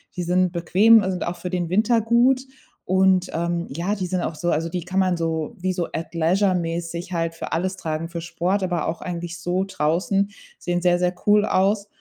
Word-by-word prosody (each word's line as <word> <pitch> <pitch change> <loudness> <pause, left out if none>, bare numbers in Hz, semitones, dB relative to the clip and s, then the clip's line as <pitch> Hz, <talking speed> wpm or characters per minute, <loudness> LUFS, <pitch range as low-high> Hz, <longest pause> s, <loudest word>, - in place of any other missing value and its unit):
Die 180 - -2
sind 180 +1 +2
bequem 200 +6 +5
und 190 - -1
sind 180 - -3
auch 170 - -3
für 180 +1 -6
den 175 -2 -1
Winter 220 +5 +3
gut, 240 +4 +3 0.4
und, 185 0 +3
ähm, 170 +1 -1
ja, 170 +9 -2
die 185 -3 -3
sind 185 +1 -1
auch 155 - -3
so 175 +2 -1
also, 165 +2 0
die 175 0 -4
kann 185 +3 -1
man 185 -1 +2
so, 160 -2 -2
wie 185 +1 -1
so 175 -2 -2
Athleisure-mäßig 170 +1 -1
halt 165 -1 -1
für 165 - -6
alles 185 +3 -1
tragen, 160 -1 -3
für 170 0 -5
Sport, 175 +4 -1
aber 180 -3 -1
auch 165 - -4
eigentlich 175 -1 -5
so 175 +2 0
draußen. 190 +3 0 0.3
Sehen 175 0 -1
sehr, 175 0 +3
sehr 180 0 0
cool 210 0 +5
aus 200 +2 +1
180 Hz, 205 wpm, -23 LUFS, 170-190 Hz, 0.4 s, bequem